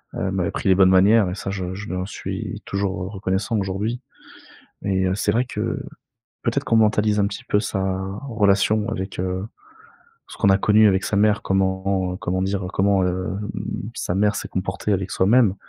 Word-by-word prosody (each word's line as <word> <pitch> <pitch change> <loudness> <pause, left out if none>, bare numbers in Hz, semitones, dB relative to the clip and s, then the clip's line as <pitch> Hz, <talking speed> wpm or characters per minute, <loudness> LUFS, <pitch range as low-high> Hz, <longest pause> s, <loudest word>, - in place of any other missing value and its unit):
Heu, - - -4
elle - - -1
m'a 95 -2 0
appris 95 - -2
les 95 - +6
bonnes 95 0 +5
manières, 95 +2 +5
et 90 - -4
ça 100 - -5
je 95 -2 -4
je 105 +2 -7
lui - - -3
en 90 - -2
suis - - -5
toujours, 100 -2 -2
heu, - - -5
reconnaissant 100 +2 -1
aujourd'hui, 100 +5 -2 0.9
et 95 -1 +1
heu, 95 - +1
c'est 105 +1 0
vrai 120 +3 +2
que 115 -2 -3 0.6
peut-être 115 -2 0
qu'on - - 0
mentalise 105 -1 +3
un 100 - +3
petit - - -8
peu 105 - +1
sa 100 -2 -2 0.5
relation 105 -1 +2
avec, 95 -4 -4
heu, 95 +1 -2 0.8
ce - - -11
qu'on 100 - +3
a 95 - +5
connu 105 +2 +5
avec 95 -1 +2
sa - - -1
mère, 105 +1 +3
comment 95 -1 0
comment 95 +1 -1
dire, 95 0 -1
comment, 95 -1 +2
hem, 95 +3 -3 0.5
sa 90 - -2
mère 105 +1 +2
s'est - - -4
comportée 95 +2 -2
avec 95 0 -2
soi-même 105 +1 +4
100 Hz, 195 wpm, -22 LUFS, 95-105 Hz, 0.9 s, les